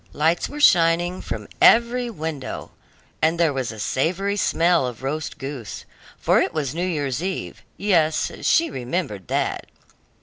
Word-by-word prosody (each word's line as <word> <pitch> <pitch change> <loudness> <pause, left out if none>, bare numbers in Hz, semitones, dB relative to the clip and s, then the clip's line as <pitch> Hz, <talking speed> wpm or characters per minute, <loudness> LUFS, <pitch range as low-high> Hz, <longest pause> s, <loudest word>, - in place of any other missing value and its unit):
Lights 160 +3 +1
were 295 - -7
shining 175 - +4
from - - -6
every 240 +1 +5
window, 160 - -5 0.5
and 160 +2 +2
there 165 -4 +3
was 130 -3 -2
a 110 - -10
savory 185 - 0
smell 170 -6 +2
of 125 0 -8
roast 150 +3 -3
goose, 135 -7 -7 0.3
for - - +3
it - - -2
was 145 -4 -1
New 175 +3 -1
year's 145 -5 -2
eve 190 +1 -4 0.2
yes, 165 -6 +2
she 335 0 +3
remembered 125 - -4
that. - - -1
160 Hz, 145 wpm, -23 LUFS, 135-185 Hz, 0.5 s, every